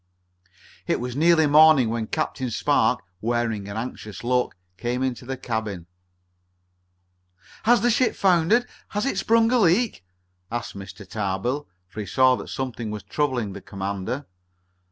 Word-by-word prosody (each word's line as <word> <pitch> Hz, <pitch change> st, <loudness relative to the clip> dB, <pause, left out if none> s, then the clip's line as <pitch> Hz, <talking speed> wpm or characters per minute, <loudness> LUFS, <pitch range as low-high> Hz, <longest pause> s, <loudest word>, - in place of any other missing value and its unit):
It -, -, +1 dB
was 125 Hz, 0 st, -4 dB
nearly 160 Hz, +1 st, +4 dB
morning 150 Hz, -4 st, +6 dB
when 115 Hz, -1 st, -2 dB
Captain 135 Hz, -5 st, -2 dB
Spark, 110 Hz, -, +2 dB, 0.2 s
wearing 115 Hz, -3 st, -1 dB
an 100 Hz, -, -5 dB
anxious 110 Hz, -3 st, -6 dB
look, 125 Hz, +1 st, +1 dB, 0.2 s
came 120 Hz, +5 st, -2 dB
into 125 Hz, -1 st, -3 dB
the 135 Hz, 0 st, -3 dB
cabin. 110 Hz, -8 st, -4 dB, 1.8 s
"Has 235 Hz, -1 st, +5 dB
the 240 Hz, -, +3 dB
ship 250 Hz, +2 st, +2 dB
foundered? 190 Hz, +6 st, +3 dB, 0.2 s
Has 210 Hz, +4 st, -2 dB
it 275 Hz, -, 0 dB
sprung 230 Hz, +1 st, +3 dB
a 250 Hz, -, +4 dB
leak?" 200 Hz, -, +2 dB, 0.5 s
asked 120 Hz, -2 st, -4 dB
Mr. 100 Hz, 0 st, -9 dB
Tarbill, 105 Hz, +8 st, -2 dB, 0.2 s
for 105 Hz, -, -10 dB
he 105 Hz, -, -4 dB
saw 130 Hz, +5 st, +4 dB
that -, -, -8 dB
something 125 Hz, -4 st, -4 dB
was 105 Hz, -2 st, -5 dB
troubling 120 Hz, -2 st, -1 dB
the 100 Hz, -, -8 dB
commander. 100 Hz, +8 st, -4 dB
125 Hz, 145 wpm, -24 LUFS, 110-160 Hz, 1.8 s, morning